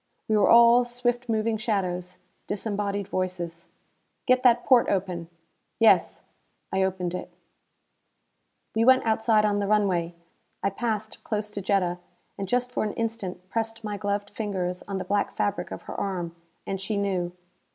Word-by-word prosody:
We 220 - +2
were 210 - +4
all 235 +1 +7
swift 245 0 -2
moving 220 0 +1
shadows; 185 -5 -2 0.3
disembodied 205 -1 -2
voices. 180 -3 -3 0.6
"Get 255 0 +4
that 245 -1 +4
porte 255 -3 +5
open." 180 -3 -2 0.5
"Yes." - - +4 0.5
I 190 - +2
opened 185 -2 -1
it. 180 - -5 1.4
We 225 - +2
went 260 +1 +5
outside 220 -1 +3
on 205 -1 +1
the 200 - -1
runway. 185 -5 +1 0.5
I 195 - +2
passed 220 0 -3
close 210 -1 -3
to 205 - -4
Jetta, 185 -2 +1 0.4
and 195 -2 -5
just 250 0 +1
for - - -1
an 210 - -2
instant 205 -6 -4
pressed 225 +2 -3
my 210 -1 -3
gloved 205 0 -2
fingers 190 -4 -3
on 200 -1 -3
the 185 - -4
black 205 0 0
fabric 205 - -1
of - - -7
her - - -7
arm 175 -4 -3 0.3
and 195 -1 -3
she 205 +2 -2
knew. 185 -3 -1
205 Hz, 155 wpm, -26 LUFS, 185-225 Hz, 1.4 s, all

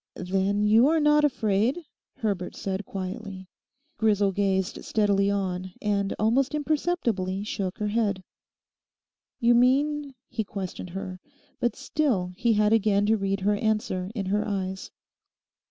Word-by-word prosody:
'Then 195 +3 0
you 220 +5 +6
are 320 +1 +3
not 300 0 +4
afraid?' 245 - +1 0.3
Herbert 195 -5 -2
said 195 +1 -4
quietly. 190 0 -6 0.5
Grisel 205 -3 +3
gazed 190 -1 -1
steadily 200 -2 +2
on, 185 -2 -2
and 200 -1 0
almost 250 +7 +2
imperceptibly 265 - -1
shook 195 -3 -3
her 210 -1 -1
head. 205 -4 0 1.2
'You 240 -1 +4
mean?' 275 +3 +2
he 225 -2 -3
questioned 190 -2 -6
her; 185 0 -6 0.4
but 240 - 0
still 265 -10 0
he 235 +3 +2
had 210 0 +3
again 205 -2 +3
to 220 +2 +3
read 195 -1 -1
her 205 +2 +2
answer 210 -4 -1
in 200 -4 -2
her 205 +3 +1
eyes. 190 -2 -3
205 Hz, 135 wpm, -26 LUFS, 195-235 Hz, 1.2 s, you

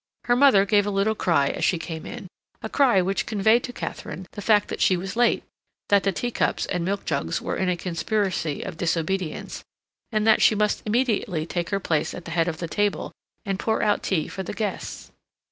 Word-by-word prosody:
Her 240 - +3
mother 245 -7 +6
gave 205 0 +3
a - - +1
little 200 +2 +1
cry 165 -9 +2
as - - -4
she 180 - +3
came 165 -1 -6
in; 235 -4 -7 0.4
a - - -3
cry 245 -10 +4
which 195 +2 -1
conveyed 220 +2 +3
to 245 - -6
Katharine 190 -5 -6
the 205 - -7
fact 210 -1 +3
that - - -4
she 185 - +4
was 190 +3 -5
late, 240 0 +3 0.5
that 200 -1 +5
the 195 - +1
teacups 240 +6 -1
and 180 -2 -2
milk 200 +3 -2
jugs 140 - -1
were - - -3
in 190 - 0
a 180 - 0
conspiracy 180 -3 -1
of - - -7
disobedience, 170 0 -2 0.5
and 215 -1 +1
that 220 -1 +5
she 215 - +5
must 210 0 +1
immediately 210 -8 0
take 170 0 -3
her 200 - 0
place 160 -5 -1
at 175 - -9
the 170 - -7
head 165 0 +1
of 160 -3 -2
the 170 - -4
table 205 +4 -1 0.3
and 195 -1 -2
pour 220 -1 0
out 205 - +2
tea 170 -6 0
for 190 - -6
the 185 - -5
guests. 210 -2 -4
195 Hz, 215 wpm, -24 LUFS, 175-215 Hz, 0.5 s, mother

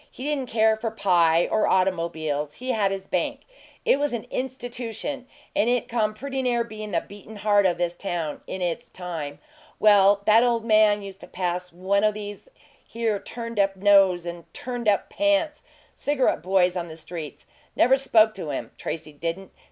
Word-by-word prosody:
He 255 - -10
didn't 280 -4 -2
care 220 -1 +3
for 225 +1 -3
pie 175 -6 +3
or 215 - +2
automobiles 165 -5 0
he 255 +1 -3
had 210 -5 +2
his 195 0 -4
bank. - - -2 0.4
It 275 - +4
was 290 -2 0
an 235 - -3
institution, 255 +1 -4 0.3
and 225 - +2
it 245 -1 +1
come 215 -2 0
pretty 270 +3 -4
near 240 -2 +1
bein' 215 -2 -8
the 165 -2 +1
beatin' 205 +2 -12
heart 205 -1 +3
o' 175 - +1
this 175 0 -1
town 175 -4 -4
in 185 - -4
its 175 +7 -3
time. 165 -6 -6 0.4
Well, 200 -1 +5
that 220 +2 +6
ole 235 -2 +2
man 215 -2 +4
used 195 -1 -9
to - - -11
pass 180 0 -3
one 190 +4 0
o' 215 - +4
these 205 - -8 0.3
here 225 -3 -2
turned 230 0 -6
up 195 -1 +2
nose 190 -3 +4
and 170 -1 -8
turned 245 -2 -5
up 205 -1 +2
pants 300 0 +1 0.3
cigarette 280 - 0
boys 180 0 +2
on 175 -1 -3
the 160 -1 -10
streets. 165 -2 -8 0.3
Never 255 +3 +5
spoke 230 -5 +4
to 180 -7 -6
him, 140 - -4
Tracy 155 -1 -5
didn't. 170 +5 -5
205 Hz, 180 wpm, -25 LUFS, 180-235 Hz, 0.4 s, that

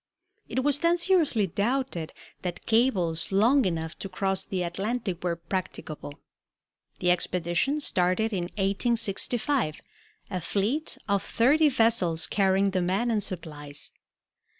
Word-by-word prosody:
It 260 - -1
was 290 0 +2
then 340 +2 +3
seriously 335 - +3
doubted 205 -2 -1 0.3
that 180 -2 -5
cables 195 -10 +1
long 235 +7 +4
enough 160 -3 -3
to 195 - -5
cross 190 0 -1
the 185 -2 -3
Atlantic 190 +1 -3
were 175 -2 0
practicable. 165 -4 -5 0.8
The 180 - +2
expedition 180 - 0
started 185 0 +1
in 180 -3 -1
1865, 210 - 0 0.5
a 185 -2 -2
fleet 215 - -1
of 200 -1 +2
thirty 295 +6 +3
vessels 225 - +3
carrying 195 -1 +2
the 185 -1 0
men 195 +7 0
and 215 -2 +1
supplies. 150 -6 -6
195 Hz, 125 wpm, -27 LUFS, 175-240 Hz, 0.8 s, long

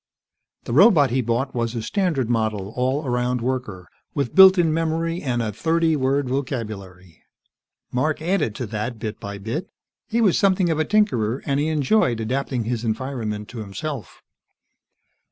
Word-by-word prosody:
The - - -5
robot 155 - +6
he 130 +1 +1
bought 120 +3 -1
was 115 -1 -2
a 115 - -2
standard 165 - 0
model 110 -3 -1
all 130 +4 0
around 125 0 0
worker, 120 -7 -4 0.3
with 140 -5 -1
built 190 0 +8
in 165 -3 +3
memory 165 +1 -1
and 120 -4 -1
a 110 - -2
thirty 160 +7 +1
word 135 0 0
vocabulary. 105 - -5 0.7
Mark 155 +5 0
added 160 - 0
to 125 - -4
that, 110 +2 -4
bit 110 -1 -5
by 100 0 -6
bit. 115 - -4 0.4
He 230 +1 0
was 205 -7 +3
something 190 -3 +3
of 160 - -1
a 155 - +2
tinkerer, 135 - +1
and 140 0 0
he 150 - 0
enjoyed 145 - +2
adapting 125 +2 -2
his 115 0 -3
environment 110 -3 -3
to 120 - -8
himself. 110 - -6
130 Hz, 160 wpm, -22 LUFS, 110-155 Hz, 0.7 s, built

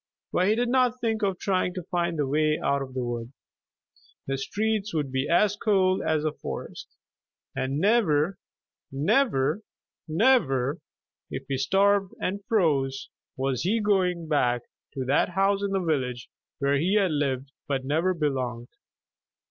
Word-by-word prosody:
But 185 - +2
he 215 - +3
did 240 +1 0
not 250 -1 +2
think 225 -2 -1
of 195 -3 0
trying 185 -2 0
to 180 - -4
find 170 -1 -1
the 145 - +1
way 155 +2 +2
out 140 0 0
of 130 -1 -7
the 130 - -1
wood. 120 0 -4 0.9
The 135 0 -2
streets 210 +4 -1
would 145 -4 -1
be 130 +1 -1
as 200 +4 +3
cold 190 -3 +2
as 155 -1 0
the 155 - 0
forest, - - -7 0.7
and 135 +2 -1
never, 185 -3 +2 0.5
never, 150 - +1 0.5
never, 155 - +2 0.5
if 135 - -6
he 135 -2 -2
starved 195 +5 +2
and 200 +2 -3
froze, 140 -10 +1 0.3
was 130 -1 -1
he 210 +6 +1
going 185 -5 +1
back 125 -6 +1 0.3
to 130 -1 -3
that 140 +6 +2
house 195 +2 +1
in 200 - -1
the 195 0 0
village 125 -6 -1 0.3
where 140 0 +1
he 185 +7 +1
had 195 -5 +3
lived 140 -2 -1 0.2
but 135 -2 -1
never 165 +6 +1
belonged. 130 -6 -2
160 Hz, 155 wpm, -26 LUFS, 135-200 Hz, 0.9 s, he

